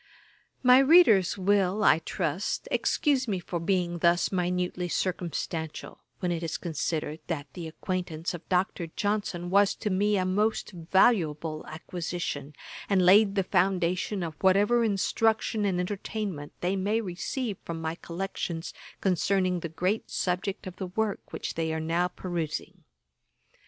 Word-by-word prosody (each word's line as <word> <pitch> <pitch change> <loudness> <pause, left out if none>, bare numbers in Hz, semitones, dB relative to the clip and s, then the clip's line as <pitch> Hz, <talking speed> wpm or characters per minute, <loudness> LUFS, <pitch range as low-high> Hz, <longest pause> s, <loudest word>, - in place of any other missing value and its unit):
My 250 0 +8
readers 270 - +6
will, 200 +1 +2
I 160 - +6
trust, 165 +2 -2
excuse 275 -4 +1
me 200 -3 0
for 175 0 -4
being 175 0 0
thus 170 +1 +3
minutely 180 -1 -1
circumstantial, 170 -3 -3 0.2
when 180 - -1
it 170 -1 -2
is 165 -2 -3
considered 155 -2 -3
that 155 -5 -3
the 170 -2 -6
acquaintance 170 0 -3
of 175 -1 -9
Dr. 180 -2 0
Johnson 195 -1 -2
was 200 0 +4
to 210 - -3
me 205 +2 +2
a 185 - +1
most 210 +5 0
valuable 165 -4 +1
acquisition, 160 -3 -5 0.3
and 190 -3 +3
laid 200 +2 +6
the 195 - +2
foundation 185 +1 +1
of 165 -2 -4
whatever 205 +5 +4
instruction 220 +1 +1
and 185 -3 +1
entertainment 190 -4 -4
they 180 +2 0
may 205 +4 +1
receive 205 +3 -3
from 165 -1 -5
my 160 0 -2
collections 170 -1 -5 0.3
concerning 185 0 +1
the 170 - -5
great 185 +7 -1
subject 185 +2 -2
of 185 0 -8
the 190 - -4
work 210 +2 -2
which - - -4
they 160 -1 -1
are 160 - -2
now 165 +3 +1
perusing. 175 -3 -5
180 Hz, 140 wpm, -28 LUFS, 170-200 Hz, 0.3 s, My